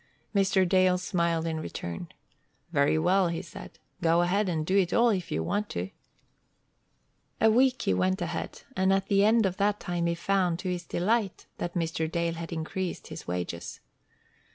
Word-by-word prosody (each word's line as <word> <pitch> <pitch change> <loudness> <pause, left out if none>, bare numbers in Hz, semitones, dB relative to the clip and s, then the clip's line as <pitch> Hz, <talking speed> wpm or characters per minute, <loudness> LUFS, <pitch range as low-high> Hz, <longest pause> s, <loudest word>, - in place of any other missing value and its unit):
Mr. 195 -2 +3
Dale 185 0 +4
smiled 170 -3 0
in 160 -1 -2
return. 85 - -6 0.6
"Very 140 +2 +3
well," 180 +3 +3
he 170 +1 -3
said. 170 - -11 0.2
"Go 170 +1 +3
ahead 195 +3 +1
and 160 -3 -1
do 185 - 0
it 190 -3 +3
all 235 +1 +5
if 190 -6 -1
you 80 +1 -1
want 205 - -1
to." 90 +2 -4 1.5
A 220 - +5
week 255 +2 +3
he 95 - +2
went 95 +1 +1
ahead, - - -4
and 190 +1 +2
at 195 0 +1
the 200 -1 +4
end 220 +1 +4
of 185 -1 -1
that 205 +1 +1
time 175 -1 -2
he 170 - 0
found, 180 -1 +1
to 185 +1 -3
his 175 -1 -4
delight, 200 +2 0
that 175 - -4
Mr. 165 -1 -1
Dale 170 -1 0
had 165 0 -7
increased 170 +3 -4
his 155 -1 -8
wages. 90 -1 -4
175 Hz, 175 wpm, -28 LUFS, 165-195 Hz, 1.5 s, all